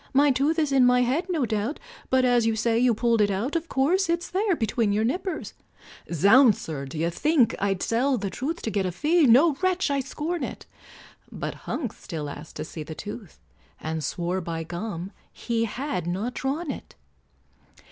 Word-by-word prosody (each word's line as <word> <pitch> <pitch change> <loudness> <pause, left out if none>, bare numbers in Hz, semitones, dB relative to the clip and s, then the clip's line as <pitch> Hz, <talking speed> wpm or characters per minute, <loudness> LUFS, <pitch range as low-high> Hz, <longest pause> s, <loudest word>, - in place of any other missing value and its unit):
My 285 +1 +5
tooth 285 +5 +1
is 305 -3 +1
in 270 -2 +5
my 250 0 +5
head 275 +10 0
no 320 -8 +1
doubt, 220 +6 -2 0.3
But, 260 0 +3
as 240 -2 +3
you 225 - +1
say 230 +1 +1
you 245 -2 +3
pulled 230 0 +2
it 205 - +3
out, 210 - -2
Of 335 0 -2
course 340 +8 +2
it's 340 +1 -1
there 390 0 +1
between 225 -3 0
your 210 +2 +1
nippers," 355 - -2 0.6
"Zounds, 205 - +6
sir! 145 -4 -5
d'ye 160 +5 -2
think 295 - +2
I'd 195 -2 0
sell 255 +4 +1
the 200 -3 -3
truth 315 +7 -4
To 225 - -2
get 195 -2 0
a - - -2
fee? 305 - +3
no, 280 +7 +6
wretch, 370 -4 +1
I 280 - +1
scorn 300 +5 -3
it!" - - -6 0.7
But - - -4 0.2
Hunks 245 -9 -4
still 150 -3 -5
asked 150 +2 -10
to 155 - -4
see 160 - -8
the 155 +1 -7
tooth, 210 0 -8 0.4
And 160 0 -3
swore 175 +5 -2
by 165 -1 -4
gum! 175 +2 -5 0.2
he 230 -1 -1
had 245 - -3
not 200 +8 -2
drawn 280 +5 -2
it. - - -9
240 Hz, 190 wpm, -25 LUFS, 195-290 Hz, 0.7 s, Zounds